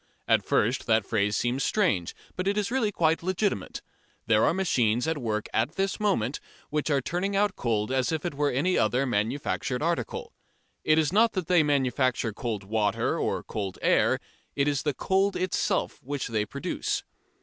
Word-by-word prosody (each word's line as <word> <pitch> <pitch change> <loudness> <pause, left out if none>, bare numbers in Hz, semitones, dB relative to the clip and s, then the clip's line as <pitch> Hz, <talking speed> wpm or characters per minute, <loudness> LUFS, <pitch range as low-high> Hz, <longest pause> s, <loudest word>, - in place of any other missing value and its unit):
At - - +3
first 120 +5 +1
that 110 -3 +3
phrase 105 -1 +1
seems 125 +3 0
strange, 135 - +1 0.2
but 185 +1 -2
it 200 +1 +1
is 210 +2 0
really 240 -5 +1
quite 165 -4 +2
legitimate. 185 - -2 0.4
There 110 -1 +3
are - - +4
machines 125 - +1
at 160 -2 -1
work 110 -4 -2
at 120 +7 0
this 195 0 -1
moment 150 - 0 0.3
which 150 +1 -1
are 140 -2 +2
turning 180 +8 -2
out 205 0 +2
cold 110 -1 -1
as 130 +1 +1
if 160 0 -2
it 175 - -2
were 145 +1 +1
any 150 +9 +1
other 125 +5 +2
manufactured 125 +3 -1
article. 165 -9 -2 0.5
It 155 - +4
is 160 +1 +2
not 225 +2 +4
that 185 -4 -2
they 180 -1 +4
manufacture 130 -5 +1
cold 110 -3 -4
water 105 +1 0
or - - -1
cold 100 -3 -4
air, - - +3 0.4
it 140 0 +1
is 145 -2 +1
the 150 -3 -1
cold 195 +1 +1
itself 185 -1 -1
which 140 -1 -4
they 105 -2 -1
produce. 140 - -3
140 Hz, 180 wpm, -27 LUFS, 115-180 Hz, 0.5 s, are